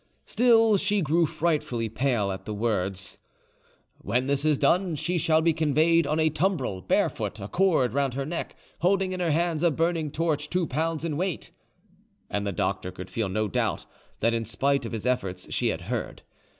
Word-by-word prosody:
Still 225 -3 +4
she 200 +1 +1
grew 160 +2 +2
frightfully 145 -10 -1
pale 115 -3 0
at 95 0 -7
the 105 - -4
words, 100 -4 -2 0.8
"When 125 +2 0
this 140 +1 0
is 150 -2 +3
done, 175 +5 +2
she 175 +4 -1
shall 160 0 +3
be 165 0 +3
conveyed 160 +2 +3
on 155 +2 0
a 160 0 +3
tumbril, 155 - -1
barefoot, 105 - 0
a 100 - -5
cord 160 - +2
round 135 -2 0
her 135 0 -2
neck, 165 +3 -4 0.2
holding 190 +1 +2
in 185 - -4
her 175 -2 0
hands 165 0 +1
a 170 - +4
burning 165 0 0
torch 150 -1 -1
two 180 -1 0
pounds 160 +3 -2
in 155 -3 -2
weight," 185 -1 -3 0.8
and 100 0 -1
the - - 0
doctor 95 +1 -2
could 90 0 -9
feel 105 0 -1
no 110 +3 0
doubt - - -1 0.4
that 115 +1 +3
in 115 -1 0
spite 135 +3 0
of - - -8
his 115 0 -5
efforts 95 -8 -2
she - - +1
had - - -1
heard. - - -4
150 Hz, 190 wpm, -26 LUFS, 115-170 Hz, 0.8 s, Still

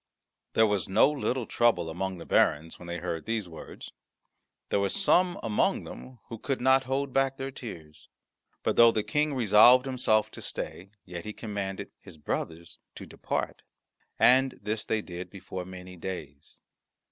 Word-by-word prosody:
There 110 - +5
was 105 -4 0
no 95 - +5
little 130 -4 -2
trouble 110 -9 +2
among 95 +3 -3
the 85 - -9
barons 80 +2 +1
when 85 - -11
they 85 0 -4
heard 85 +1 -4
these 110 -4 -1
words. 80 -2 -10 0.8
There - - +2
were 100 0 +1
some 185 -2 +2
among 110 -2 +1
them 130 -1 -10
who 115 - -8
could 135 +2 -2
not 130 +1 +4
hold 135 0 -2
back 135 0 +1
their 135 0 -4
tears. 80 -12 -10 0.5
But - - 0
though 115 0 +8
the 110 -2 -1
King 150 +1 0
resolved 120 +2 +6
himself 120 -5 +1
to - - -10
stay, 95 +3 -6 0.2
yet 85 -2 -7
he 105 - -6
commanded 100 -4 -5
his - - -13
brothers 80 +2 -5 0.2
to - - -9
depart. - - -4 0.6
And 130 +1 +4
this 105 +2 -3
they 110 -1 -1
did 90 0 -7
before 95 -1 -7
many 90 0 -10
days. 80 -5 -8
105 Hz, 165 wpm, -28 LUFS, 90-130 Hz, 0.8 s, though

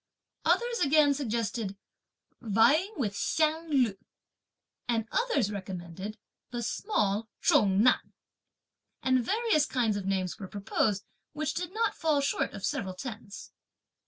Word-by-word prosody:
Others 475 0 +2
again 290 0 +5
suggested: 230 -6 -2 0.6
"Vying 260 - +3
with 220 -7 0
the 200 - -6
Hsiang 320 +1 +1
Lu;" 250 -9 +2 0.9
and 225 -2 0
others 285 - +1
recommended 190 +1 -6 0.3
"the 240 -1 -4
small 215 - 0
Chung 200 0 +4
Nan." 255 - +3 0.9
And 260 -1 +3
various 410 - +2
kinds 230 -5 +1
of 195 -1 -4
names 190 0 -1
were 195 - -6
proposed, 200 0 -1 0.3
which 305 -1 -2
did 355 +1 -3
not 450 +3 0
fall 310 -3 +1
short 280 - 0
of 200 - -4
several 185 -1 -2
tens. 215 -2 -8
235 Hz, 130 wpm, -29 LUFS, 200-305 Hz, 0.9 s, again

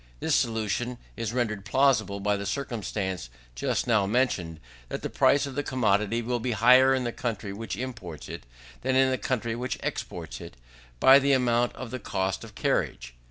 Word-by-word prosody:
This - - 0
solution 115 +2 0 0.2
is 115 -2 -3
rendered 110 -5 -1
plausible 110 -6 +2
by 105 +1 +1
the 100 0 -4
circumstance 100 - -3 0.2
just - - -1
now 105 -5 +2
mentioned, 100 -9 0 0.3
that - - -5
the - - -3
price 145 +1 +4
of 140 - -6
the 145 - -1
commodity 115 -3 +1
will 120 +1 -1
be 120 +1 -1
higher 125 +4 +6
in 130 - -1
the 120 - -2
country 105 -5 -4
which 110 -1 -5
imports 110 - -6
it, - - -8 0.3
than 130 +1 0
in 130 0 +4
the 130 - -1
country 115 -3 -1
which 125 +2 -3
exports - - -5
it, - - -10 0.4
by 135 - +8
the 140 0 +2
amount 120 -2 +2
of 125 -3 -7
the 130 - -4
cost 95 -2 -2
of 110 -2 -12
carriage. - - -1
115 Hz, 185 wpm, -27 LUFS, 100-130 Hz, 0.4 s, by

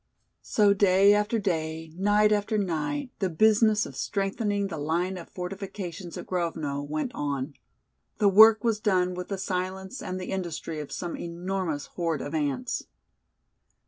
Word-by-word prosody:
So 205 -2 +3
day 195 0 +5
after 210 +2 +1
day, 160 -5 -2
night 205 +3 +3
after 210 +1 +1
night 200 - -2
the 190 - 0
business 215 +4 +4
of - - -9
strengthening 200 +1 -1
the 170 -6 -5
line 170 +5 -1
of 175 -2 -9
fortifications 180 -1 -6
at - - -7
Grovno 160 -6 -2
went 150 +1 -3
on. 140 -1 -3 0.6
The 210 - +3
work 220 +2 +8
was 225 -3 +1
done 185 -4 +1
with 180 0 -5
the 195 - -3
silence 190 +3 -3
and 185 - -4
the 185 - -5
industry 170 -4 -4
of 150 - -7
some 175 -1 -4
enormous 175 -3 -3
horde 165 -5 -2
of 145 - -6
ants. 150 - -2
185 Hz, 150 wpm, -27 LUFS, 165-205 Hz, 0.6 s, work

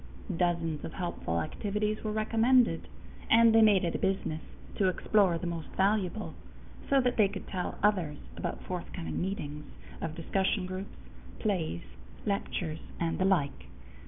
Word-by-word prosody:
Dozens 165 -3 0
of - - -5
helpful 170 - -2
activities 210 - -2
were 215 - -1
recommended, 225 +3 +3 0.4
and 230 0 +7
they 225 - +7
made 210 -4 +6
it 170 - -1
a - - -1
business 190 -5 0 0.3
to 195 - +2
explore 185 -1 +3
the 170 - -5
most 170 -2 -3
valuable, 200 +1 +1 0.6
so 275 - +5
that 250 -1 0
they 210 -3 +6
could 195 0 -7
tell 180 -2 -3
others 180 -8 +2 0.2
about 65 -1 -4
forthcoming 80 +5 -4
meetings 150 -6 -3 0.4
of 160 -1 -3
discussion 190 +3 0
groups, 185 +2 -6 0.4
plays, 175 - -1 0.4
lectures, 180 -5 -2 0.2
and 170 +1 -1
the 190 - +3
like. 170 -8 +1
190 Hz, 145 wpm, -30 LUFS, 165-210 Hz, 0.6 s, and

